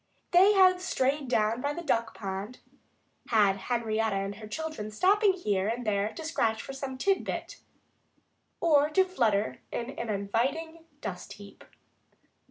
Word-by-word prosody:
They 380 +4 +6
had 370 -2 +5
strayed 280 -5 0
down 225 0 +1
by 285 +2 -1
the 345 - -5
duck 230 -7 0
pond 200 +4 -5 0.7
had 205 -3 +3
Henrietta 225 -1 -1
and 195 +1 -2
her 215 -1 -9
children, 310 -4 -5
stopping 390 - +3
here 205 - -1
and 235 +2 -2
there 205 0 0
to 320 - -7
scratch 225 -8 0
for 270 - -7
some 270 -1 -5
tidbit, 390 +8 -1 1.0
or 300 -3 +4
to 375 +5 +3
flutter 215 - 0
in 235 +2 -4
an 235 -4 -6
inviting 265 +12 -2 0.2
dust - - -6
heap. - - -13
245 Hz, 145 wpm, -29 LUFS, 215-320 Hz, 1.0 s, They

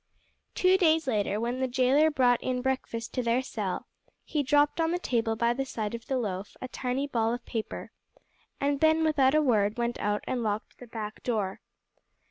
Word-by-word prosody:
Two 370 +1 +4
days 320 -3 +4
later 210 -4 0
when 240 +3 -2
the 260 - +1
jailer 260 +5 +4
brought 250 -5 +3
in 250 -1 -2
breakfast 255 -4 -2
to 250 - 0
their 240 +2 +1
cell 205 -7 -3 0.4
he 300 - -1
dropped 290 +3 +3
on 325 - +2
the 350 - +1
table 230 -9 0
by 235 +1 +2
the 270 +3 -2
side 220 -5 -4
of 230 -1 -7
the 265 - 0
loaf 200 -4 -4
a 255 - -5
tiny 255 +2 -2
ball 230 -4 0
of 245 - -10
paper, 225 -2 -5 0.7
and 280 0 0
then 315 0 +4
without 290 -3 +3
a 310 - +4
word 215 -5 +2
went 235 0 -1
out 205 0 -1
and 250 -2 -2
locked 215 -1 -3
the 245 - -11
back 220 -2 -6
door. 210 -6 -2
250 Hz, 195 wpm, -28 LUFS, 225-280 Hz, 0.7 s, Two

